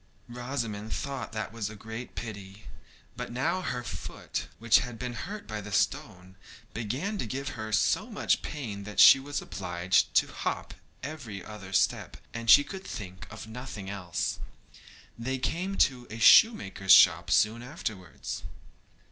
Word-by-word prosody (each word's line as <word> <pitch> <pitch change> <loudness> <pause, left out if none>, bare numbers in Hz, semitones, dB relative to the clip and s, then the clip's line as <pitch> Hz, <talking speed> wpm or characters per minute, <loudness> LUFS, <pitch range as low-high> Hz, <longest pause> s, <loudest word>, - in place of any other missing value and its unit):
Rosamond 120 -4 -4
thought 140 -2 -4
that 110 0 -4
was 110 -3 -3
a 110 - -9
great 110 +3 -8
pity. 100 -2 -8 0.5
But - - -6
now 160 +10 0
her 125 -8 -3
foot, - - -5
which 115 0 +5
had 125 -3 -6
been 125 +1 -4
hurt 200 - -6
by 110 -1 -5
the 105 +1 -9
stone, 95 0 -1 0.4
began 135 - -3
to - - -2
give 135 +4 -4
her 110 -3 -6
so - - +2
much - - +1
pain 110 -9 -5
that 105 0 -5
she 135 - +10
was 145 +2 -4
obliged 90 -1 0
to - - +5
hop - - -3 0.3
every 125 - -7
other 105 -3 -9
step, 95 - +1 0.2
and 115 0 -4
she 145 - +9
could 190 +4 -8
think 95 - -8
of 110 0 -9
nothing 110 -4 -7
else. 90 -5 -3 0.8
They 130 +3 -2
came 180 +9 -2
to 125 -2 -7
a 110 - -7
shoemaker's 100 - +6
shop 85 -2 +6
soon 110 +5 +3
afterwards. 110 - -6
110 Hz, 155 wpm, -29 LUFS, 100-130 Hz, 0.8 s, she